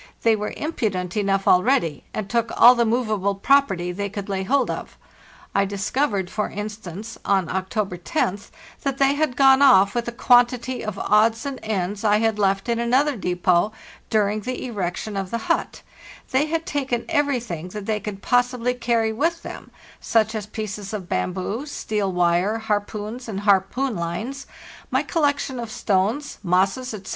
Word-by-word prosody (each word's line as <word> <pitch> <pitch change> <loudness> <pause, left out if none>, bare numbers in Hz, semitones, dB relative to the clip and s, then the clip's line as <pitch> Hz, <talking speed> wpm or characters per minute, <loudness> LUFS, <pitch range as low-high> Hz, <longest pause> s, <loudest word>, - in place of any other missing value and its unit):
They 225 -1 +5
were 210 0 -4
impudent 200 - -2
enough 195 -2 0
already, 180 - +3
and 215 -2 -4
took 230 +1 0
all 245 - +10
the 235 -2 +1
movable 215 -4 0
property 195 -6 +2
they 200 +3 -3
could 200 0 -6
lay 195 -1 -1
hold 260 +6 +1
of. - - -7 0.6
I 200 - +3
discovered, 200 +1 -1
for 210 +3 -2
instance, 210 0 -7
on 190 -3 +1
October 190 0 -2
1oth, 200 - -2 0.3
that 275 -2 -2
they 275 0 +4
had 285 -3 0
gone 270 0 +6
off 200 -8 +6
with 240 -1 -2
a - - -2
quantity 245 +1 +2
of 215 -2 -4
odds 225 +5 +2
and 275 -2 -4
ends 205 -1 -2
I 210 -1 +4
had 220 -1 0
left 195 +1 +1
in 235 -1 0
another 260 +5 +2
depot 180 0 +1 0.4
during 210 -1 +1
the 250 +5 -5
erection 205 -2 -4
of 195 -1 -3
the 230 - -2
hut; 230 - -2 0.5
they 275 +3 +2
had 325 +1 -2
taken 265 -5 -2
everything 250 - -1
that 205 +2 -7
they 215 0 -1
could 205 -1 -7
possi 245 0 +2
bly 250 +2 0
carry 230 -2 0
with 330 +8 -1
them, - - -8 0.3
such 220 -1 +1
as 215 -2 -4
pieces 210 -1 -6
of 185 -4 -7
bamboo, 195 +9 -2
steel 210 -8 -2
wire, 180 +4 +2
harpoons 215 +2 -3
and 200 -2 -4
harpoon 205 +6 +2
lines, 215 +12 -4 0.4
my - - +1
collection 285 -5 0
of 235 -2 -5
stones, 220 +5 -1
moss 185 +1 +2
es, 255 0 -6
etc. 190 -2 -9
215 Hz, 170 wpm, -23 LUFS, 195-250 Hz, 0.6 s, all